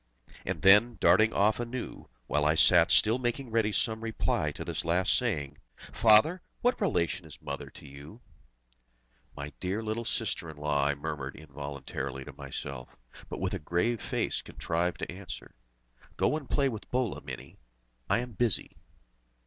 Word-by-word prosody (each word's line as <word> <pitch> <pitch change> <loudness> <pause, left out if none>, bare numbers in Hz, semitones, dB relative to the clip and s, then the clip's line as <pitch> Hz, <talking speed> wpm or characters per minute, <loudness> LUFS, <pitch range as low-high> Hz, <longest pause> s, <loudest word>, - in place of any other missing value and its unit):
And - - -3
then, 105 +4 +6
darting 110 +6 +5
off 105 +2 +3
anew, 120 +1 -5 0.2
while 75 +4 +1
I 75 +1 +3
sat 85 +1 +6
still 110 +4 +5
making 120 0 -2
ready 110 -2 +2
some 110 +1 0
reply 115 -1 0
to - - -6
this - - -2
last 85 +3 +2
saying, 70 -2 -1 0.2
"Father! 115 +12 +4 0.2
what 245 -1 +2
relation 90 - +1
is 80 -3 -12
Mother - - -6
to - - -13
you?" 70 - -11 1.2
"My 70 0 -6
dear 95 +5 -2
little 110 +2 -2
sister 100 -7 -2
in 80 - -9
the 75 - -11
law!" 75 -2 +2
I 70 - +1
murmured 70 -2 -5
involuntarily 70 -2 -6
to - - -9
myself, 65 -2 -7 0.3
but - - -5
with - - -1
a - - -2
grave 90 +9 0
face - - -1
contrived 85 +2 -2
to - - -3
answer: 95 +1 -8 0.6
"Go - - +2
and 150 -5 -5
play 140 -2 +2
with 110 -5 -5
Bhola, 125 -4 -1
Mini! - - -9 0.5
I 115 - +3
am 125 0 -6
busy!" 115 -1 -1
95 Hz, 165 wpm, -30 LUFS, 75-115 Hz, 1.2 s, then